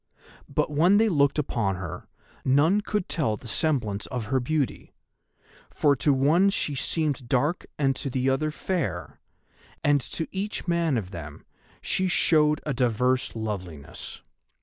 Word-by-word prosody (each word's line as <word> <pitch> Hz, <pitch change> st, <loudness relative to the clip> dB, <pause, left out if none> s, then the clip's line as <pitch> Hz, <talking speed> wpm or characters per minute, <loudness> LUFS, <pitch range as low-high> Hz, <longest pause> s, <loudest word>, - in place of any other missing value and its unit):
But -, -, 0 dB
when 170 Hz, +7 st, +4 dB
they 220 Hz, +1 st, +4 dB
looked 140 Hz, -5 st, +2 dB
upon 115 Hz, -9 st, 0 dB
her, 90 Hz, -2 st, -7 dB, 0.4 s
none 155 Hz, +10 st, +3 dB
could 210 Hz, -2 st, -2 dB
tell 125 Hz, -10 st, -1 dB
the 120 Hz, -, -12 dB
semblance 115 Hz, -7 st, 0 dB
of 125 Hz, -4 st, -4 dB
her 130 Hz, -, +4 dB
beauty, 140 Hz, +2 st, -2 dB, 0.7 s
for 145 Hz, -1 st, +2 dB
to 145 Hz, -, +2 dB
one 150 Hz, +9 st, +4 dB
she 150 Hz, -6 st, 0 dB
seemed 140 Hz, -1 st, -1 dB
dark 145 Hz, +6 st, +1 dB
and 135 Hz, -2 st, +2 dB
to 140 Hz, -, -3 dB
the 130 Hz, 0 st, -1 dB
other 135 Hz, +3 st, +1 dB
fair, 150 Hz, -, -3 dB, 0.6 s
and 145 Hz, -1 st, +3 dB
to 160 Hz, -, -4 dB
each 195 Hz, 0 st, -4 dB
man 170 Hz, -5 st, +1 dB
of 95 Hz, -4 st, -4 dB
them 75 Hz, -5 st, -9 dB, 0.4 s
she 190 Hz, -, +1 dB
showed 150 Hz, -4 st, +3 dB
a 150 Hz, -, -1 dB
diverse 125 Hz, +1 st, +1 dB
loveliness. 95 Hz, -10 st, -6 dB
140 Hz, 150 wpm, -26 LUFS, 120-160 Hz, 0.7 s, when